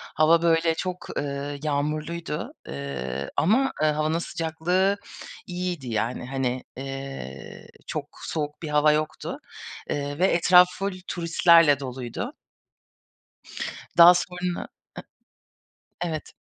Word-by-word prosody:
Hava 165 +2 +5
böyle 165 -1 +3
çok, 180 +1 -5
ııı, 140 0 -3
yağmurluydu. 150 +2 -2 0.2
Iıı, 70 -1 -4
ama, 225 - +3
ııı, 155 - +4
havanın 155 +2 0
sıcaklığı 175 +4 0 0.5
iyiydi 180 -6 -3
yani. 115 +2 -2
Hani, 130 -1 -2
eee, 135 - -7 0.2
çok - - -3 0.2
soğuk 150 -2 -4
bir 160 - -5
hava 150 0 +4
yoktu. 155 0 -2 0.5
Eee, 145 +1 -3
ve 185 - +5
etraf 180 0 +6
full 195 0 -1
turistlerle 170 -3 +5
doluydu. 125 -3 -5 1.6
Daha 170 +1 +10
sonra 180 0 -2 1.4
I - - -1
evet. 155 -3 -5
155 Hz, 105 wpm, -25 LUFS, 140-170 Hz, 1.6 s, Daha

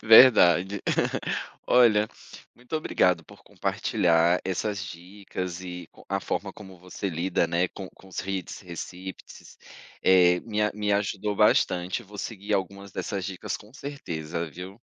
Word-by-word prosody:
Verdade. 100 -5 +7 0.9
Olha, 110 -4 +5 0.5
muito 125 +6 -9
obrigado 90 - +2
por - - -16
compartilhar 85 +1 +2
essas 95 +1 -2
dicas 90 0 -6
e 90 -1 -6
c - - -16
a 100 +1 0
forma 100 -1 -3
como 95 -3 -12
você 90 +2 -5
lida, 85 0 0
né, 85 +2 +1
com 95 -2 -8
com 95 - -18
os 95 - -4
reads, 95 -1 -4
receipts, 90 +1 -9 0.4
eh, 90 -1 +5
me 105 -2 -2
a 105 - +1
me 105 -1 0
ajudou 105 0 -1
bastante, 95 -1 +3
vou 105 0 -12
seguir 100 -2 -3
algumas 100 +1 -3
dessas 95 -2 -3
dicas 95 -2 -4
com 105 +2 -16
certeza, 85 - -5
viu. 95 +7 -9
95 Hz, 140 wpm, -27 LUFS, 90-105 Hz, 0.9 s, Verdade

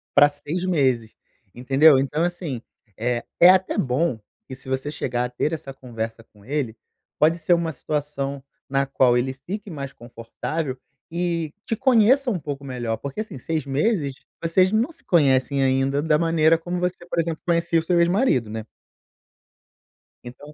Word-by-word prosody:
pra 145 0 +7
6 155 +5 -5
meses. 130 -10 +1 0.4
Entendeu? 135 +4 +5
Então, 150 +4 0
assim, 170 -9 -3 0.4
eh, 120 +1 -1 0.2
é 175 - +9
até 185 0 +3
bom 130 -1 0 0.3
que 130 - -7
se 130 - -11
você 135 +3 -2
chegar 125 -4 -2
a - - -4
ter 125 +5 -1
essa 135 -4 -6
conversa 115 -3 -6
com 105 -2 -22
ele, 130 -5 -2 0.4
pode 160 +3 +4
ser 175 - +2
uma 170 -1 +1
situação 140 -1 -3 0.3
na 135 0 +1
qual 130 -2 +3
ele 130 +2 -1
fique 205 +1 -5
mais 140 -4 -6
confortável 125 +4 -5 0.3
e 170 -3 -1
te 225 - -1
conheça 260 +2 +4
um 190 -7 -1
pouco 140 -1 -6
melhor. 120 -4 -3
Porque, 140 - -5
assim, 150 - -8
6 155 +1 -2
meses, 145 - 0 0.3
vocês 185 +3 +3
não 230 +9 +1
se - - -20
conhecem 140 -4 +3
ainda 135 +2 +1
da 155 -2 +3
maneira 165 -1 +3
como 175 +2 -4
você, 180 -1 -2
por 170 - -2
exemplo, 165 -1 -1
conhecia 170 -1 +2
o - - -4
seu 175 0 +2
ex-marido, 170 - +2
né? 110 0 -5 1.6
Então 145 +5 -11
145 Hz, 165 wpm, -23 LUFS, 130-170 Hz, 1.6 s, é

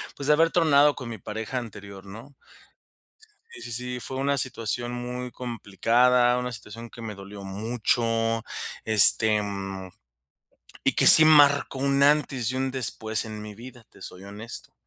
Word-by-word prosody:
pues, 140 - -6
de 150 - +5
haber 165 +2 +2
tronado 150 -4 +3
con 125 -4 -9
mi 115 - -7
pareja 110 +6 -6
anterior 100 -4 -9
¿no? 115 +8 -13 1.2
Sí - - -12
sí 120 - -9
sí, 125 +1 -5
fue 130 +2 -7
una 140 +1 -1
situación 120 -2 -4
muy 125 0 -6
complicada, 120 +2 0
una 125 0 -4
situación 115 +1 -10
que 115 +1 -14
me 105 -3 -7
dolió 100 +1 -11
mucho, 115 +2 -2 0.4
este, 110 0 +5
mm, 95 -2 -7 0.9
y - - +1
que - - +2
sí 160 - +11
marcó 145 -3 +4
un 140 +1 0
antes 140 -4 +1
y 130 - -4
un 130 0 -2
después 110 -3 -3
en 105 -1 -8
mi 105 0 -10
vida, 120 +2 -14
te - - -20
soy 90 0 -11
honesto. 105 +3 -11
120 Hz, 160 wpm, -24 LUFS, 105-130 Hz, 1.2 s, sí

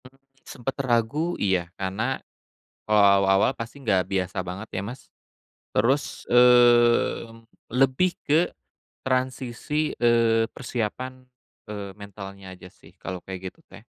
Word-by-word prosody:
Mmm, 130 +1 -16 0.3
sempet 130 +1 -5
ragu? 130 +7 0
Iya. 95 -4 0
Karena 105 +7 -2 0.7
kalau 105 -1 +4
awal-awal 100 +1 +4
pasti 115 +4 -8
nggak 95 -8 +2
biasa 95 -1 -2
banget 95 +5 -7
ya, 95 - -2
Mas. 120 +5 -7 0.7
Terus, 130 +7 0
mmm, 120 -2 +4 0.2
lebih 135 +8 +3
ke 160 +4 +2 0.6
transisi, 130 +3 -1
eee, 115 -1 +3
persiapan, 130 +1 -4 0.5
eee, 100 -2 -6
mentalnya 100 -1 -10
aja 90 - -13
sih - - -19
kalau 90 -1 -6
kayak 95 -1 -7
gitu - - -31
teh. - - -13
115 Hz, 120 wpm, -25 LUFS, 100-130 Hz, 0.7 s, kalau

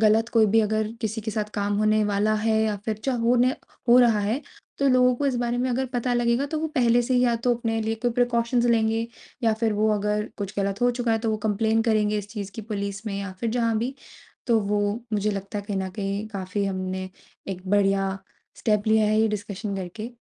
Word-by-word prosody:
गलत 220 +1 +4
कोई 225 -2 +5
भी 225 +2 +4
अगर 215 0 0
किसी 220 -1 -2
के 220 +1 -4
साथ 210 0 -3
काम 205 0 0
होने 215 0 +3
वाला 210 +1 +1
है 220 -1 +3
या 215 -1 0
फिर 220 -2 -1
चा 265 - +1
होने 250 +2 +3 0.3
हो 240 +1 +8
रहा 230 -4 +5
है। 215 +7 -1 0.4
तो 275 - +3
लोगों 250 -1 +4
को 285 - -1
इस 270 - +1
बारे 240 0 -1
में 255 +1 0
अगर 260 +2 0
पता 245 0 0
लगेगा 240 +3 +1
तो 310 +2 -3
वो 320 - 0
पहले 240 -2 +4
से 255 +2 0
ही 250 - +4
या 240 -1 +3
तो 245 -1 +4
अपने 225 -1 -2
लिए 220 +1 -1
कोई 245 - +2
प्रिकॉशन्स 240 0 +1
लेंगे 225 -1 +2 0.4
या 225 -1 +3
फिर 225 -2 +2
वो 215 +1 +1
अगर 210 +1 -1
कुछ 200 -1 -4
गलत 200 0 -1
हो 245 - +5
चुका 240 -1 -1
है 225 - +2
तो 225 0 -1
वो 215 - 0
कंप्लेन 220 +2 +2
करेंगे 215 -2 +2
इस 205 -1 -7
चीज़ 205 -2 -6
की 225 - -5
पुलिस 200 -1 -4
में 205 - -2
या 200 -1 -5
फिर 230 - -1
जहाँ 230 -1 +1
भी। 245 +4 -2 0.5
तो 230 -2 +4
वो 205 +1 0 0.3
मुझे 210 0 +1
लगता 200 0 -4
है 205 - -6
कहीं 205 - -1
न 190 0 -2
कहीं 200 +1 -2
काफ़ी 200 -1 -3
हमने 185 -1 -3 0.4
एक 185 -1 -5
बढ़िया 195 -1 +3 0.5
स्टेप 210 -1 0
लिया 220 0 +4
है 215 +1 +2
ये 220 - +3
डिस्कशन 205 -1 -4
करके 195 +5 -6
220 Hz, 235 wpm, -25 LUFS, 205-235 Hz, 0.5 s, हो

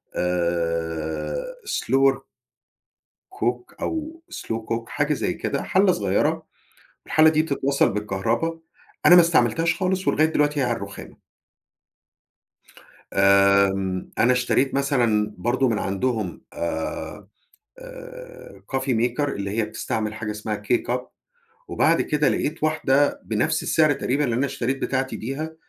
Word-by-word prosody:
آآ، 85 - -2 0.2
slower 135 - +2 1.1
cook 120 +1 -3
أو 320 +1 -4
slow 115 0 -4
cook 115 0 -3
حاجة - - 0
زي - - -2
كده، - - -3
حلّة - - +3
صغيرة، - - 0 0.6
والحلّة 155 0 +5
دي 155 0 +2
بتتوصّل 140 -2 +1
بالكهربا 115 +11 -1 0.5
أنا 180 - +9
ما 175 - +9
استعملتهاش 165 -1 +2
خالص، 190 0 -1
ولغاية 155 - +4
دلوقتي 150 -2 +1
هي - - +2
على 120 -2 0
الرُخامة. - - -9 2.0
آمم، 100 -1 +3
أنا 125 +3 +4
اشتريت 125 +2 +1
مثلًا 120 -7 +1
برضه 125 +6 +1
من 110 - 0
عندهم 100 -2 -2
آآ، 85 +3 -4 0.5
آآ - - -11
coffee 135 0 -2
maker 120 +4 0
اللي 100 -5 -4
هي 110 - +2
بتستعمل 110 0 -3
حاجة 110 -1 -4
اسمها 105 0 -4
K-Cup 120 +3 0 0.7
وبعد - - +2
كده 150 0 +1
لقيت 155 +1 -2
واحدة 145 -2 +2
بنفس - - 0
السعر 155 -2 +3
تقريبًا 140 +1 -1
اللي 120 -4 0
أنا 135 +4 +1
اشتريت 135 0 -2
بتاعتي 130 0 -1
بيها، 155 +7 -5
125 Hz, 125 wpm, -23 LUFS, 105-150 Hz, 2.0 s, أنا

